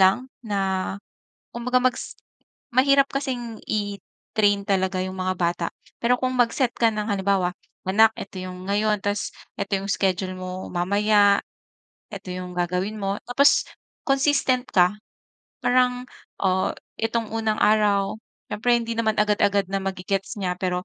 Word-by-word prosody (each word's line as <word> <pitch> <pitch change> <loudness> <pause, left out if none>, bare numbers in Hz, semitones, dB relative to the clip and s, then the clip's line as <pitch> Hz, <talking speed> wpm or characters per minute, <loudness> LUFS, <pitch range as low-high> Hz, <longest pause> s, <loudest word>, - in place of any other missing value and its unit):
lang 190 +8 +4
na 195 -4 -1 0.6
kumbaga 250 +2 +1
mag-s 255 - -1 0.6
mahirap 275 +1 +5
kasing 245 -5 -3
i-train 205 0 -1
talaga 190 -1 +1
'yong 185 0 -5
mga 185 0 -1
bata 170 -1 0 0.3
pero 240 +1 +4
kung 255 0 +1
mag-set 245 +1 +2
ka 230 -1 +4
ng 210 +1 -2
halimbawa, 195 -2 +1 0.4
"anak, 220 +3 +5
ito 195 -1 -7
'yong 185 +1 -7
ngayon. 210 0 +1
Tas 205 +1 -1 0.3
ito 200 0 -4
'yong 195 +1 -6
schedule 185 -1 0
mo 185 0 -6
mamaya. 200 +3 +3 0.7
Ito 195 -2 -7
'yong 180 0 -6
gagawin 180 +4 -1
mo 195 +1 -1
tapos 280 +4 +4 0.4
consistent 270 -2 +2
ka 180 +1 +4 0.7
parang, 250 0 +2 0.4
oh, 190 -1 +2 0.3
itong 225 0 0
unang 220 -1 0
araw", 205 -2 +3 0.4
siyempre 240 +3 +2
hindi 230 0 -3
naman 220 -1 +1
agad-agad 205 -1 +2
na 195 - 0
mage-gets 195 +2 -3
niya 180 -2 -1
pero 180 -1 -1
205 Hz, 135 wpm, -24 LUFS, 190-230 Hz, 0.7 s, mahirap